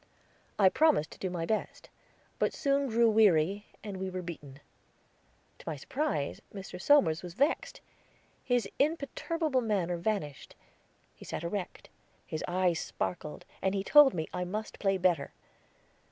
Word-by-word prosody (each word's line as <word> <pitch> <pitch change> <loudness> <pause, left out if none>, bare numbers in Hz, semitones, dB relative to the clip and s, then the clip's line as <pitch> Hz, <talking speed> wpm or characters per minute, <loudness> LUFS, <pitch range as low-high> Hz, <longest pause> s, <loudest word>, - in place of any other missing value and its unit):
I 195 -2 +6
promised 300 - +3
to - - -12
do 190 - -2
my 175 -2 -3
best, 215 +4 -3 0.5
but - - +1
soon 280 0 +1
grew 235 -1 +3
weary, 205 -3 +3 0.2
and 205 -3 -5
we 190 0 -3
were 185 0 -5
beaten. 145 -5 -9 1.0
To - - -13
my 160 - -3
surprise 150 - -2
Mr. 190 -2 -8
Somers 170 - +4
was 175 -1 -9
vexed. 285 +8 0 0.6
His 245 -5 +1
imperturbable 305 -1 0
manner 190 -6 0
vanished; 170 -7 -3 0.6
he - - -14
sat - - -5
erect, 180 +2 -5 0.4
his 155 - -4
eyes 180 -1 +1
sparkled, 155 -4 -4 0.2
and 190 +1 +1
he 195 - -1
told 290 +2 +7
me 160 -2 -2
I 180 - -2
must 210 +5 -5
play 195 -1 +2
better. 175 -6 +1
190 Hz, 145 wpm, -30 LUFS, 170-235 Hz, 1.0 s, told